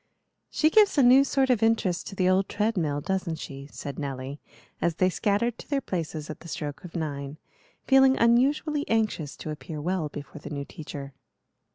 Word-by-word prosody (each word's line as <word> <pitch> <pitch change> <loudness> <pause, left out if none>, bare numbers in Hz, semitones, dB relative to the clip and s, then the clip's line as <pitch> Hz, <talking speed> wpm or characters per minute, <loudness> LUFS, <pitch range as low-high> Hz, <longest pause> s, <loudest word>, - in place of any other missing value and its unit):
"She 310 0 +2
gives 420 -4 +5
a 275 - +6
new 255 +3 +7
sort 270 -2 +2
of 235 -4 +2
interest 225 -6 +1
to - - -7
the 185 -1 +2
old 190 +1 +2
treadmill, 180 -9 0
doesn't 190 -1 -2
she?" 140 -2 -8
said 140 -2 -7
Nelly, 135 0 -5 0.4
as 170 -2 +1
they 185 +2 +2
scattered 215 +5 0
to - - -11
their 285 -2 +1
places 160 - -4
at 155 - -7
the - - -12
stroke 145 -3 -5
of 180 -1 -10
nine, 145 -3 -4 0.5
feeling 265 -1 +5
unusually 285 +6 +3
anxious 215 -10 0
to 155 - -6
appear 150 0 -7
well 170 0 -1
before 145 +1 -9
the - - -8
new 140 -2 -4
teacher. 140 -4 -8
180 Hz, 185 wpm, -27 LUFS, 150-235 Hz, 0.5 s, new